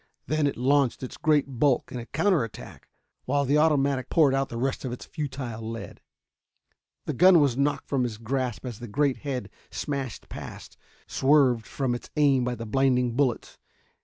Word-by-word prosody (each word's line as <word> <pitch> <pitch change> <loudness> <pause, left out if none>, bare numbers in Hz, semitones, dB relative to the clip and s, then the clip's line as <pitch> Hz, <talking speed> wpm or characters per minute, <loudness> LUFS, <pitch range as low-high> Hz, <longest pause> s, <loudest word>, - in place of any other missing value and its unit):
Then 155 -1 +1
it 140 - -3
launched 135 +1 +2
its 130 - -6
great 145 -6 +1
bulk 135 -3 +2
in 125 - -4
a 115 - -8
counter 165 - +2
attack, 115 - -10 0.4
while 140 +2 +1
the 145 +3 +3
automatic 140 -4 +2
poured 150 -5 +4
out 135 0 0
the 115 - -6
rest 135 +3 -2
of 130 - -3
its 125 - -7
futile 130 -7 -5
lead. 115 +1 -7 1.0
The 150 - -2
gun 180 +5 +6
was 140 -5 +2
knocked 140 +2 0
from 135 -2 0
his 120 -4 -2
grasp 125 +1 -3
as 120 -4 -6
the 120 - -7
great 140 +4 +1
head 130 -8 -4 0.2
smashed 140 -5 -4
past, - - -9 0.3
swerved 130 -5 +3
from 130 -3 -1
its 120 - -6
aim 140 -4 +3
by 125 0 -1
the 115 - -7
blinding 125 0 +1
bullets. 130 -4 -1
135 Hz, 180 wpm, -26 LUFS, 120-145 Hz, 1.0 s, gun